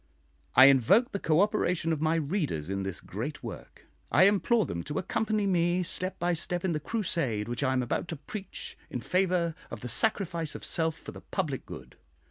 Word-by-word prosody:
I 130 - +10
invoke 140 - +5
the 200 - -2
cooperation 175 -1 +2
of 155 - -3
my 160 +1 +2
readers 145 - -1
in 95 0 -1
this 95 -2 -4
great - - -6
work: - - -9 0.3
I 150 +9 +6
implore 205 +3 +4
them 85 - -4
to 150 +1 -4
accompany 215 +2 0
me 175 -1 +2
step 185 +2 -1
by 175 +1 +1
step 175 +2 -2
in 180 - +1
the 155 - -1
crusade 150 - -1
which 120 +3 -3
I 130 -2 +2
am 130 -1 +1
about 120 - -2
to 165 - -4
preach 190 +7 -7
in 125 - -4
favour 180 -1 +1 0.2
of 105 - -7
the 125 - -5
sacrifice 170 - 0
of - - -7
self 160 -1 0
for - - -9
the - - -11
public 155 -9 -3
good. 65 -1 -10
165 Hz, 195 wpm, -29 LUFS, 135-190 Hz, 0.3 s, I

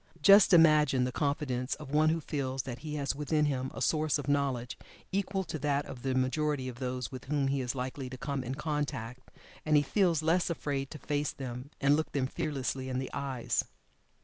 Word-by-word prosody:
Just 200 0 +8
imagine 155 -6 +6
the 125 - -1
confidence 140 -3 -1
of 150 -3 -10
one 155 +1 +4
who 165 +1 +1
feels 135 -4 -3
that 125 -2 -6
he 150 +1 -5
has 140 -2 -1
within 150 +1 +1
him 130 -2 -1
a - - -4
source 155 -1 +2
of 145 -2 -6
knowledge 135 -4 0 0.4
equal 195 0 -1
to 160 -3 -5
that 145 0 0
of 125 - -9
the 130 0 -1
majority 130 +1 0
of 125 -1 -7
those 125 -1 -3
with 130 -2 -8
whom 140 -1 0
he 135 0 0
is 125 +1 -3
likely 130 +1 -4
to 130 - -7
come 135 0 -3
in 130 +2 -4
contact, 145 -5 -4 0.3
and 155 -1 +2
he 145 - +4
feels 170 -1 +2
less 170 +3 +2
afraid 140 -4 -2
to - - -8
face 145 -1 -1
them, 125 0 -6
and 140 +1 +4
look 155 +1 -2
them 140 -2 +1
fearlessly 135 -2 -3
in 130 - -2
the 130 0 -3
eyes. 135 -3 -1
140 Hz, 205 wpm, -31 LUFS, 130-150 Hz, 0.4 s, Just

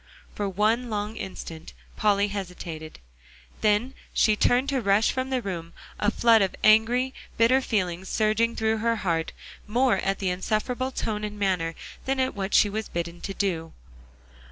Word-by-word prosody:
For 205 -1 -2
one 220 +5 +1
long 210 0 -3
instant, 165 -5 -7 0.2
Polly 205 -1 +2
hesitated; 175 -5 -6 0.6
then 215 +5 +2 0.2
she 215 - +4
turned 245 +5 +3
to 270 -2 0
rush 200 +1 +3
from 260 0 -2
the 255 -2 -1
room, 170 -4 -5 0.3
a 205 - +3
flood 230 -1 +4
of 195 - 0
angry, 235 +4 +4 0.2
bitter 250 +4 +4
feelings 185 -6 -2
surging 220 +2 +1
through 220 0 +1
her 230 +1 +1
heart, 170 -6 -1 0.4
more 240 0 +3
at 195 +1 -1
the 190 - -1
insufferable 220 +7 -1
tone 215 -5 -3
and 210 0 -4
manner, 180 -5 0 0.3
than 270 0 0
at 260 0 +1
what 195 -1 -2
she - - +6
was 215 +2 -4
bidden 170 0 -4
to 195 - -5
do. 165 -5 -2
210 Hz, 160 wpm, -26 LUFS, 190-230 Hz, 0.6 s, she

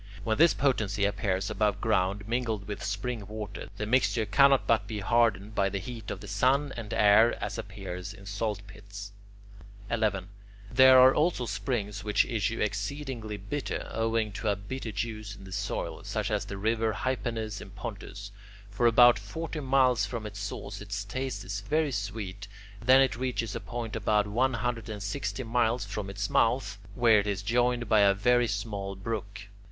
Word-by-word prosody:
When 110 +2 0
this 170 +1 +6
potency 105 -7 +1
appears 95 -1 -1
above 105 -1 +1
ground 100 -2 0
mingled 115 -4 -2
with 105 - -5
spring 105 +1 -3
water, 105 -1 -7
the 105 - -2
mixture 115 -1 +2
cannot 135 +6 +5
but 115 -1 +2
be 110 - -4
hardened 110 -1 +2
by 100 -2 +2
the 100 - -3
heat 110 +2 -7
of - - -5
the 105 - -9
sun 130 +8 +2
and 115 -2 -7
air, 105 +2 +5
as - - -4
appears 95 -3 -6
in 100 -2 -13
salt 100 0 -3
pits. 100 +1 -10 0.8
11. 105 -4 0 0.4
There 130 +1 +8
are 130 +1 +8
also 155 -5 +1
springs 105 -1 -3
which 105 0 +2
issue 115 -1 -1
exceedingly 110 +1 -3
bitter, 105 +9 -4
owing 115 -1 0
to 100 - -5
a 100 - +2
bitter 110 +4 -6
juice 110 -1 -4
in - - -13
the 95 - -11
soil, 100 +2 -3
such - - -2
as - - 0
the 100 - -6
river 110 +2 0
Hypanis 115 -4 -3
in - - -10
Pontus. 100 -1 -8 0.4
For 120 +4 +2
about 120 -1 +7
forty 160 +10 -5
miles 130 -5 +3
from 115 -1 -5
its 100 -1 -7
source 100 0 -6
its 100 0 -4
taste 125 0 -4
is 100 +2 -4
very 150 +7 0
sweet; 100 -2 -4 0.4
then 130 +3 +7
it 135 - +2
reaches 125 -4 -2
a - - -2
point 120 -2 -5
about 105 -1 +2
one 120 +5 +1
hundred 115 -1 -3
and 105 -2 -5
sixty 130 +5 -3
miles 120 -1 +1
from 100 0 -5
its 100 0 -3
mouth, 115 -3 +1 0.2
where 115 -3 +5
it 100 - -2
is 100 -1 -2
joined 120 +1 +1
by 110 - +4
a 100 -1 +5
very 120 +4 +3
small 100 -2 -3
brook. 105 +1 -5
110 Hz, 180 wpm, -29 LUFS, 100-120 Hz, 0.8 s, There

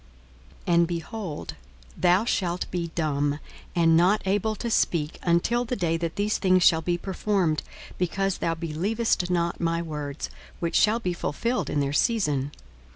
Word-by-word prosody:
42:001:020 175 - +1
And, 170 0 +5
behold, 175 0 -5 0.4
thou 180 +4 +3
shalt 180 -6 0
be 170 -2 -2
dumb, 145 -3 0 0.4
and 165 -2 +4
not 185 +6 +4
able 205 +3 +1
to 235 +2 -4
speak, 160 -7 +1
until 175 +8 +2
the 245 +1 -2
day 170 -6 0
that 165 0 -3
these 205 +1 0
things 185 -2 +4
shall 160 -1 +5
be 175 +2 0
performed, 190 -3 0 0.4
because 195 +2 0
thou 165 0 0
believest 180 +5 -1
not 170 -1 0
my 165 0 +1
words, 150 -3 -5 0.3
which 170 -1 -2
shall 220 +2 +4
be 180 -6 -2
fulfilled 235 +9 -2
in 145 - 0
their 140 0 -1
season. 150 - +1
175 Hz, 155 wpm, -26 LUFS, 165-200 Hz, 0.4 s, And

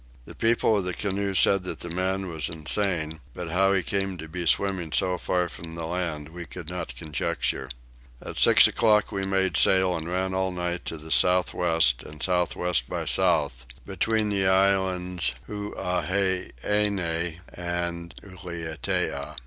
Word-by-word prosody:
The - - -10
people 115 -1 +2
of 100 - +1
the 90 -1 -2
canoe 100 -1 -2
said 100 0 +5
that - - -5
the 85 - -5
man 95 +2 -1
was 80 -3 -1
insane, 80 -1 -1 0.2
but 85 -2 -5
how 95 +2 +3
he 95 -2 +2
came 95 0 -2
to 80 -1 -8
be 85 +1 -4
swimming 95 -2 +2
so 90 +2 +1
far 90 -1 0
from 85 0 -9
the 85 -1 -4
land 80 -4 -3
we 85 0 -8
could 85 -3 -8
not 90 -9 -5
conjecture. 65 -2 -2 0.5
At - - -6
six - - +8
o'clock 105 -2 +3
we 95 -1 -2
made 95 -1 +1
sail 95 -1 +4
and 80 0 -4
ran 95 +1 -1
all 95 0 0
night 90 -1 -3
to 80 - -4
the 80 +1 -10
south 90 +7 +3
west 80 -8 +3
and 75 0 -9
south 90 -2 +1
west 90 -2 0
by - - -3
south, - - +1 0.2
between 105 +2 0
the 100 -2 +1
islands 95 -5 +2
Huaheine 95 -1 -1 0.5
and 85 -1 -4
Ulietea. 80 -5 -3
90 Hz, 160 wpm, -26 LUFS, 80-95 Hz, 0.5 s, six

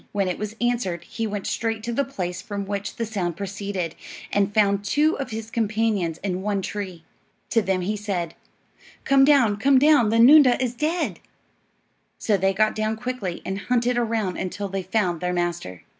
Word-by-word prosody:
When 200 -2 0
it 180 - -3
was 210 +1 -5
answered 235 -9 -1
he 225 +5 -4
went 205 -2 -4
straight 225 -1 -2
to 235 +1 -3
the 280 - +1
place 180 -10 -4
from 200 -1 -5
which 200 0 -4
the 230 - -2
sound 185 -6 -3
proceeded, 200 -3 -4 0.4
and 205 0 +2
found 200 -1 +2
two 295 +10 +2
of 275 - -3
his 220 0 -6
companions 215 -7 0
in 185 -2 -2
one 200 -1 -1
tree. 185 -6 -5 0.5
To 230 - +4
them 190 -2 0
he 205 +4 -1
said, 190 -5 -3 0.7
"Come 275 +1 +5
on; 245 -8 +4
get 270 +4 +4
down; 285 -5 +5
the 225 - +2
noondah 255 +1 +7
is 250 -2 -1
dead." 310 +7 -1 1.0
So 215 - +1
they 195 0 +2
got 215 +3 +2
down 215 0 -1
quickly 245 -7 -4
and 190 +1 -3
hunted 245 0 +2
around 225 -5 -1
until 195 +2 -4
they 195 0 -2
found 185 -3 -1
their 180 0 -1
master. 175 - -3
210 Hz, 185 wpm, -24 LUFS, 190-235 Hz, 1.0 s, noondah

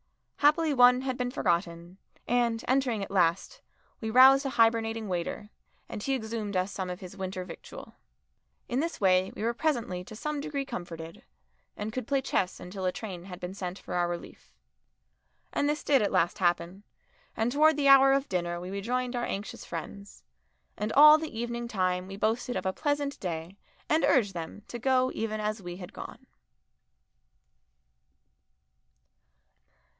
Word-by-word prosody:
Happily 305 +1 +3
one 250 -1 +6
had 260 -1 -2
been 250 0 0
forgotten, 175 -4 -2 0.3
and, 235 -2 +1
entering 255 -5 +1
at 195 - -7
last, 185 - +1 0.4
we 220 - -3
roused 265 +4 +7
a 275 - -1
hibernating 225 -2 +2
waiter, 185 +3 -4 0.4
and - - -6
he 270 +5 0
exhumed 220 -4 -3
us 185 +2 0
some 190 -2 -4
of 180 0 -5
his 185 0 -9
winter 185 -1 -5
victual. 175 - -10 0.7
In 245 - -1
this 335 +3 -2
way 185 -1 +3
we - - -5
were 235 +1 +1
presently 235 - -1
to 215 - -10
some 300 +4 -3
degree 285 -2 -3
comforted, 165 -7 -7 0.5
and 210 +1 -4
could 255 -2 -4
play 280 -1 +2
chess 185 -7 -1
until 190 +1 -6
a 185 - +2
train 185 -4 -7
had 180 -2 -9
been 180 +1 -6
sent 185 -1 -5
for - - -8
our 175 -1 +1
relief. 175 0 -8 1.0
And 285 - +1
this 300 0 -2
did 280 -3 +4
at 205 - 0
last 170 - +1
happen, 175 +1 0 0.6
and 225 +2 +1
towards 305 +2 +4
the 285 -1 +2
hour 270 0 +8
of 275 +1 +2
dinner 175 -2 -2
we 180 +2 -7
rejoined 245 +5 -2
our 240 - -1
anxious 200 +1 -5
friends, 200 - -8 0.5
and 210 +1 -3
all 300 +2 +9
the 310 -8 -6
evening 235 0 -3
time 185 -4 -1
we 195 0 -8
boasted 225 +4 -1
of - - -3
a 190 - 0
pleasant 290 +1 -1
day 170 +1 -5 0.3
and 315 +1 +2
urged 210 -8 +3
them 170 +4 -7
to 240 - -6
go 255 +1 +2
even 215 -1 -3
as 215 0 -2
we 175 -1 -7
had 180 -2 -10
gone. - - -9
215 Hz, 170 wpm, -29 LUFS, 185-255 Hz, 1.0 s, all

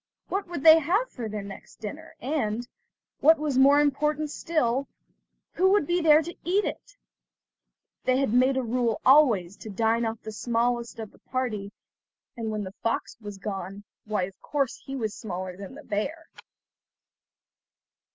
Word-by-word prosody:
What 390 0 -2
would 345 -5 -5
they 320 0 +9
have 380 +11 0
for 230 -4 -5
their 210 -1 -4
next 200 0 -11
dinner, 315 +9 -8
and, 240 -4 -2 0.5
what 320 +2 +6
was 295 -3 0
more 280 +2 +7
important 295 +1 +1
still, 275 -6 0 0.7
who 375 +2 +3
would 410 -7 +3
there 320 -2 +4
be 345 +3 -7
to - - -34
eat 390 +4 +1
it? - - -6 1.1
They 255 0 +3
had 270 -5 +1
made 260 +2 +4
a 260 - 0
rule 235 -1 0
always 235 - +5
to 220 - -9
dine 225 +3 +1
off 225 0 -4
the 220 - -6
smallest 235 +1 -1
of 220 -2 -7
the - - -22
party, 220 -6 -3 0.6
and 225 -2 -4
when 215 -1 -2
the 190 0 -7
fox 230 - -2
was 205 -2 -8
gone, 195 0 -6 0.2
why 210 -3 -1
of 190 +1 -7
course, 280 -4 -1
he 270 - -6
was 220 -5 -2
smaller 185 -4 -5
than 200 +6 -9
the 300 - -11
bear. 280 +10 -3
250 Hz, 165 wpm, -26 LUFS, 215-300 Hz, 1.1 s, they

